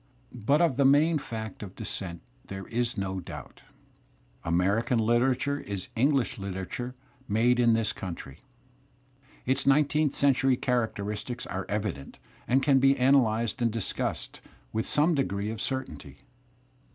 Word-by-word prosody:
But 125 +6 +2
of 140 -7 +2
the 140 - +4
main 150 +4 +4
fact 110 -7 -6
of 100 -2 -8
descent 95 -6 -4 0.2
there 95 0 -6
is 120 0 -1
no 95 -1 -2
doubt. 90 - -10 0.4
> - - -35
American 100 +8 +2
Uterature 130 +5 +1
Is 100 -3 -5
English 130 -2 +1
literature 100 +6 -5 0.3
made 120 +4 +3
in 120 -1 +5
this. 115 -1 0
country. 85 -6 -7 1.1
Its 130 +2 0
nineteenth 150 +1 +3
century 135 -2 +3
characteristics 115 -2 -2
are 95 +1 -5
evident 100 -10 -3 0.3
and 135 +2 +3
can 140 -2 +5
be 135 +1 +4
analyzed 125 -3 +2
and 120 - +3
discussed 115 -3 -3 0.3
with 110 0 -1
some 155 +4 +3
degree 105 -7 -1
of 110 0 -6
certainty. 130 -1 -5
120 Hz, 135 wpm, -28 LUFS, 105-135 Hz, 1.1 s, in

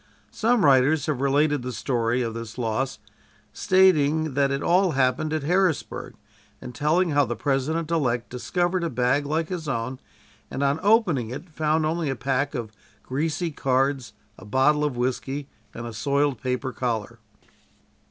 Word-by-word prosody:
Some 230 -3 +2
writers 140 +2 +4
have 145 -4 -2
related 145 +1 +2
the 125 +1 -4
story 120 0 0
of 115 -1 -3
this 115 0 -7
loss, 125 +2 -1 0.6
stating 160 - +3
that 140 0 +2
it 140 0 -2
all 180 +1 +3
happened 135 +3 +1
at 155 -2 -1
Harrisburg, 180 -1 0 0.4
and 125 - -9
telling 160 +6 +1
how 145 0 +4
the 120 -2 -3
President 145 +6 -1
elect 125 -7 0
discovered 175 +8 -1
a 170 - 0
bag 130 +2 +1
like 160 +2 -1
his 175 -4 -4
own, 130 0 -3 0.5
and 135 - -3
on 140 +2 +1
opening 195 - +3
it 160 +8 -8
found 155 0 +1
only 160 -1 -1
a 135 - -1
pack 135 +3 -1
of 115 -4 -4 0.3
greasy 160 +5 -2
cards, 135 -3 0 0.3
a - - -12
bottle 135 +8 +2
of 145 -5 -1
whisky 130 +3 -2 0.2
and 120 - -7
a 115 - -6
soiled 140 +3 0
paper 130 0 -2
collar. 115 -1 -3
140 Hz, 160 wpm, -24 LUFS, 125-155 Hz, 0.6 s, writers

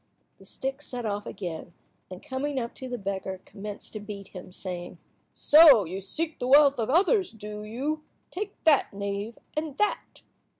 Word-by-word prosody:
The - - -16
stick 270 +1 -4
set 245 -4 -4
off 205 -1 -3
again, 175 -2 -6 0.4
and 185 -1 -9
coming 275 0 -2
up 235 -1 -4
to 260 - -8
the 245 - -3
beggar 195 -2 -4
commenced 205 0 -7
to 215 - -4
beat 205 -2 -8
him, 180 -1 -10
saying— 180 -1 -6 0.4
"So 295 - +8
you 185 +4 -5
seek 315 - -3
the 250 - -2
wealth 280 0 +6
of 225 - -1
others, 375 - +3
do 210 -1 -7
you? 280 +8 -3 0.3
Take 405 +2 -5
that, 310 -4 +4
knave, 200 +3 -4 0.2
and 305 -2 -3
that." 420 - -1
230 Hz, 170 wpm, -27 LUFS, 200-290 Hz, 0.4 s, So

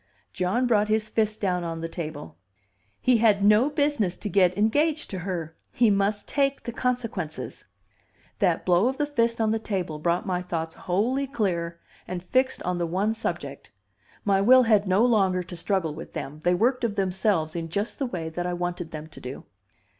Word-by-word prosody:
John 185 +8 0
brought 210 -4 +3
his 215 0 0
fist 215 -1 0
down 180 -3 0
on 165 -1 -4
the 165 - -2
table. 155 - -7 0.6
"He 255 -2 +4
had 210 -3 +3
no 210 +6 +5
business 285 - 0
to 210 - -5
get 185 -1 +3
engaged 295 +9 +1
to 190 - -4
her! 175 -3 -4 0.2
He 230 -3 +4
must 200 +1 0
take 275 -1 0
the 235 - -4
consequences." 230 -10 -3 0.7
That 180 -5 +1
blow 180 +5 +4
of 265 +1 -1
the 295 - +1
fist 235 -5 0
on 220 -1 +2
the 225 - 0
table 185 -8 -3
brought 170 +3 0
my 180 -2 -1
thoughts 165 -2 -4
wholly 235 +10 0
clear 170 -9 -2 0.3
and 180 -1 -5
fixed 255 +7 +1
on 180 0 -1
the 170 - 0
one 195 +6 0
subject; 225 - -5 0.6
my 195 -2 +3
will 255 +5 +7
had 210 -3 +3
no 190 +5 +4
longer 190 -6 +2
to 175 +1 -9
struggle 170 -2 -1
with 160 +2 -9
them, 145 +3 -6
they 175 0 +3
worked 250 +6 +1
of 220 -3 0
themselves 185 -4 +1
in 165 -1 -3
just 205 +6 -3
the 270 - 0
way 170 -8 -4
that 175 +2 -3
I 180 - -2
wanted 175 -1 -3
them 155 -1 -7
to 160 - -13
do. 130 +2 -7
195 Hz, 190 wpm, -26 LUFS, 175-230 Hz, 0.7 s, will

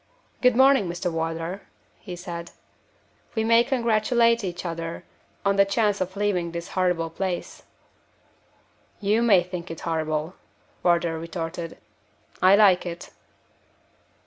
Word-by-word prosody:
"Good 250 -2 +4
morning, 265 -5 +5
Mr. 175 +1 -3
Wardour," 165 +3 -3 0.4
he 180 -4 -8
said. 170 -1 -7 0.9
"We 220 - +1
may 230 +1 +5
congratulate 235 -2 +2
each 180 -1 -5
other 165 -1 -5 0.4
on 200 0 +2
the 200 - +7
chance 205 0 0
of 185 +1 -3
leaving 185 -5 -1
this 170 0 -5
horrible 180 -3 0
place." 185 0 -4 1.4
"You 210 +3 +2
may 205 -7 +5
think 180 -1 -7
it 165 - -7
horrible," 155 0 -2 0.5
Wardour 170 -2 +1
retorted; 165 0 -5 0.6
"I 185 +2 +7
like 200 -4 +5
it." 170 -1 -7
180 Hz, 120 wpm, -25 LUFS, 170-205 Hz, 1.4 s, the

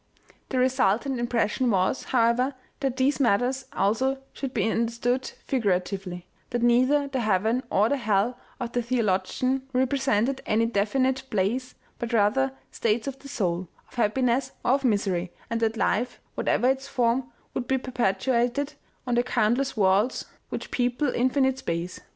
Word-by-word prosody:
The 260 - -1
resultant 255 0 +2
impression 240 +1 +1
was, 190 +4 +1
however, 250 +2 +2 0.2
that 270 -2 -1
these 275 +2 +2
matters 250 +2 +2
also 245 +7 +1 0.2
should 270 -2 -4
be 225 - 0
understood 235 +3 0
figuratively, 185 -6 -1 0.2
that 240 -1 -1
neither 255 +4 +4
the 265 -1 -2
heaven 220 +2 +1
or 210 +2 +3
the 285 - +1
hell 220 0 +1 0.2
of 245 -2 -3
the 245 - 0
theologian 235 +2 0
represented 260 -1 +1
any 225 +2 +3
definite 255 +5 +1
place, 220 +6 -1 0.2
but 235 -1 -4
rather 230 +5 +3 0.2
states 225 0 0
of 270 -1 -5
the 280 - -11
soul, 180 -8 -1 0.2
of - - -21
happiness 250 +3 +1
or - - +4
of 275 +1 +2
misery, 195 -7 +1 0.2
and 230 - 0
that 225 0 0
life, 245 +2 0
whatever 245 - +1
its 265 +1 0
form, 245 0 0 0.2
would 245 - -3
be 265 - +2
perpetu 245 -3 0
ated 245 +5 +1 0.3
on 245 - -1
the 240 - +4
countless 245 +2 +1
worlds 200 +5 +2 0.2
which - - -5
people 250 +2 0
infinite 265 +1 +2
space. 170 -4 -3
245 Hz, 150 wpm, -26 LUFS, 215-260 Hz, 0.3 s, neither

